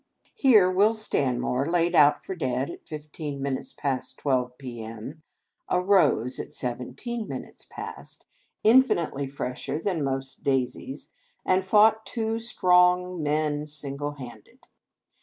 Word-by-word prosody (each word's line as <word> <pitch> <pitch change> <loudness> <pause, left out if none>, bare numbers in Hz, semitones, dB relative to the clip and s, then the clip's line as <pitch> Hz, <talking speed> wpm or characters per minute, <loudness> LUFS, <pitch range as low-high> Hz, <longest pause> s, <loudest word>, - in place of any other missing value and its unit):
Here, 220 -9 +5
Will 200 +5 +3
Stanmore, 130 - 0
laid 175 0 +2
out 150 -3 +5
for - - -4
dead 130 -3 -2
at - - -12
fifteen 150 -2 -6
minutes 135 -1 -3
past 135 -3 -3
twelve, 125 -3 -1
p.m., 120 +3 -8 0.5
arose 180 - +2
at - - -6
seven 125 0 -4
teen 235 - -4
minutes - - -8
past, - - -9 0.4
iufinitely 175 - +3
fresher 135 +1 -4
than 165 -2 -1
most 135 0 -4
daisies, 135 0 -2 0.3
and 185 0 +2
fought 220 +2 +5
two 225 -1 -2
strong 180 -4 +3
men 150 0 0
single 145 -1 -4
handed. 120 -6 -12
150 Hz, 120 wpm, -26 LUFS, 135-185 Hz, 0.5 s, Here